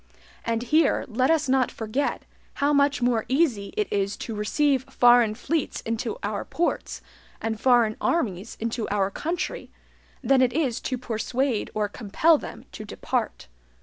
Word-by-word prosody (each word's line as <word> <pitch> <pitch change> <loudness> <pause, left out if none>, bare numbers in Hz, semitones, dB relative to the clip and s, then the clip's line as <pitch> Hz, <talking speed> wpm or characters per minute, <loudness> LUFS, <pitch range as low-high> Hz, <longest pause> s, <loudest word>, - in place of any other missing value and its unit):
And 230 0 -1
here 305 +3 +2
let 255 +4 +1
us 320 -3 +2
not 260 -2 +2
forget 225 +6 -2 0.3
how 285 +1 +1
much 280 -2 +2
more 240 -3 +2
easy 255 -8 +1
it 425 - +1
is 200 0 0
to 230 - -5
receive 265 +6 +1
foreign 240 -3 +5
fleets 290 +6 -2
into 225 0 -3
our 205 0 -2
ports, 345 - -2 0.4
and 220 -1 -3
foreign 240 -4 +4
armies 215 - -1
into 230 0 -3
our 200 -1 0
country, 335 - -3 0.5
than 270 -1 +4
it 250 -2 +3
is 265 -5 0
to 255 - -2
persuade 240 +1 -1
or 210 -1 +1
compel 250 +10 +2
them - - -9
to - - -8
depart. - - -3
245 Hz, 150 wpm, -25 LUFS, 220-280 Hz, 0.5 s, foreign